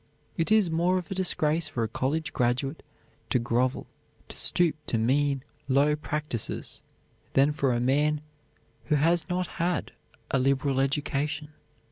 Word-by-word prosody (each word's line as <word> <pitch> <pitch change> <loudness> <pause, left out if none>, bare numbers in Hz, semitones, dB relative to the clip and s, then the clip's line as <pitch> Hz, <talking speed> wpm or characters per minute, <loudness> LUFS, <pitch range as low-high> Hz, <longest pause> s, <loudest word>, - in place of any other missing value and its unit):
It 165 +4 0
is 215 -6 +4
more 175 +3 +2
of 180 -2 -5
a - - +1
disgrace 165 -4 +1
for 125 -5 -2
a - - 0
college 145 +7 -2
graduate 130 +5 0 0.5
to - - +3
grovel, 120 +2 0 0.4
to - - -7
stoop 175 -3 +2
to 115 - +1
mean, 135 +4 +1 0.2
low 140 +2 +3
practises, 150 -5 -3 0.5
than 140 +2 +4
for 140 -3 +1
a 120 - +1
man 145 +4 +2 0.6
who 150 - +2
has 165 +4 +2
not 180 +1 0 0.2
had 175 +1 0 0.4
a 135 - +2
liberal 135 +1 +1
education. 145 +2 -1
145 Hz, 145 wpm, -27 LUFS, 135-160 Hz, 0.6 s, is